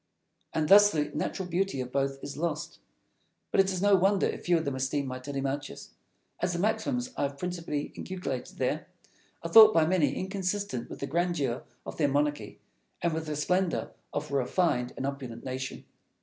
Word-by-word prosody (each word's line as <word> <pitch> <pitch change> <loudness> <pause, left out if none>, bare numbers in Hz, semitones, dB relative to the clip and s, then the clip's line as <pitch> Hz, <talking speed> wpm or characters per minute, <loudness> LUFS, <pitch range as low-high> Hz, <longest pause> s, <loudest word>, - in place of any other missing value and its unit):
And 155 -1 0
thus 205 +3 +8
the 150 -5 -1
natural 180 +4 -2
beauty 180 -3 -1
of 125 -1 -4
both 135 0 0
is 140 - -6
lost. 155 -2 -3 0.7
But - - +2
it 195 0 +4
is 185 0 -2
no 205 -1 +6
wonder 195 +1 +3
if - - -3
few 175 -1 +4
of 160 - -2
them 140 - -1
esteem 130 +2 -1
my 130 -1 -5
"Telemachus," 140 +1 -4 0.5
as 175 0 0
the - - -2
maxims 245 +6 0
I - - -1
have 140 0 -1
principally 165 -3 -3
inculcated 140 -9 -5
there - - -1 0.6
are 165 - -4
thought 215 +2 +10
by 160 -1 +5
many 160 -5 +2
inconsistent 190 - -3
with - - -9
the - - -1
grandeur 150 -5 -1 0.2
of - - -7
their 150 - +3
monarchy, 145 +1 -1 0.5
and 170 -2 +2
with 160 0 -3
the 150 - -2
splendour 180 +4 0 0.2
of 145 0 -4
a - - -1
refined 125 -2 +1
and 135 - -2
opulent 130 -4 -5
nation. 130 0 -5
155 Hz, 185 wpm, -29 LUFS, 140-185 Hz, 0.7 s, thought